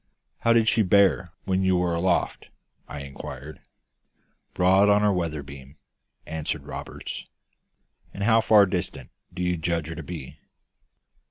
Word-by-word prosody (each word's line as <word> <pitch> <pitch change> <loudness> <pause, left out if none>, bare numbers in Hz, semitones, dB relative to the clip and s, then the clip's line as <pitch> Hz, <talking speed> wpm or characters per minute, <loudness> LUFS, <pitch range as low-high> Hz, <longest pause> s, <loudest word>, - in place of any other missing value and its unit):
"How 115 - +2
did 115 -1 +4
she 115 - +3
bear 95 -3 +3
when 95 0 +1
you 95 -1 +3
were 90 -1 0
aloft?" 85 +1 0 0.4
I 75 - -7
inquired. 70 +1 -9 1.0
"Broad 95 +3 +4
on 105 0 +4
our 105 -1 +3
weather 80 -5 -2
beam," 70 +1 -12 0.5
answered 80 -1 -3
Roberts. - - -7 0.8
"And 100 - -5
how 115 +1 +4
far 105 -2 +6
distant 65 -8 -4 0.2
do 90 - -4
you 90 0 0
judge 80 -1 -2
her 80 - -5
to - - -6
be?" 80 -7 -8
90 Hz, 145 wpm, -25 LUFS, 75-100 Hz, 1.0 s, far